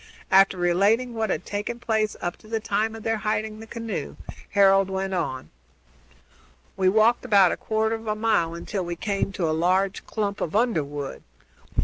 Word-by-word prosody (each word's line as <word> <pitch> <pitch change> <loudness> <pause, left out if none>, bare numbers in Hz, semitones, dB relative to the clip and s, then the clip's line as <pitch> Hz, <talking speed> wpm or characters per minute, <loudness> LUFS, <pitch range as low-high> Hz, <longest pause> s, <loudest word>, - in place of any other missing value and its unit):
After 195 0 +5
relating 200 +8 +2
what 220 -2 -1
had 180 - -2
taken 205 +3 -3
place 220 -3 0
up 175 - -2
to - - -18
the 225 0 -1
time 215 +1 -1
of 220 - -9
their 225 0 0
hiding 215 0 -2
the 225 - -10
canoe, 230 0 -5 0.3
Harold 195 -1 +4
went 190 0 -2
on: 130 - -3 1.2
"We 185 -1 +3
walked 220 +4 +3
about 200 -7 +5
a - - -1
quarter 220 0 0
of 225 0 -5
a 215 - 0
mile 215 -7 +1
until 185 +3 -4
we 175 0 -4
came 195 +2 -2
to 175 -3 -1
a 155 - +1
large 185 +4 +1
clump 205 -2 -2
of 165 - -3
underwood. 145 - -1
205 Hz, 175 wpm, -25 LUFS, 185-220 Hz, 1.2 s, After